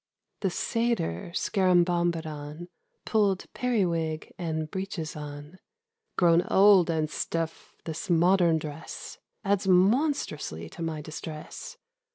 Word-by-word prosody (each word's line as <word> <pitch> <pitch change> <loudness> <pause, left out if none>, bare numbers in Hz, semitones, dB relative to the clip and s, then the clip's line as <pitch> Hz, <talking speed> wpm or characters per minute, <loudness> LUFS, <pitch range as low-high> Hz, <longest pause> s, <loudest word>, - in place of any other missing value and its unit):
THE 195 - 0
Satyr 225 - -1
Scarabombadon 175 -4 +1 0.4
Pulled 205 -4 +2
periwig 170 -10 -1
and 160 -3 -3
breeches 190 -5 -4
on: 150 +3 -8 0.3
' 455 0 -54
Grown 170 -1 +5
old 195 -3 +6
and 160 -2 +1
stiff, 165 +1 -4
this 165 +4 -5
modern 175 0 +4
dress 155 0 -7 0.3
Adds 200 0 +1
monstrously 185 - +2
to - - -10
my 160 -2 -3
distress. 155 0 -8
170 Hz, 105 wpm, -28 LUFS, 155-195 Hz, 0.4 s, old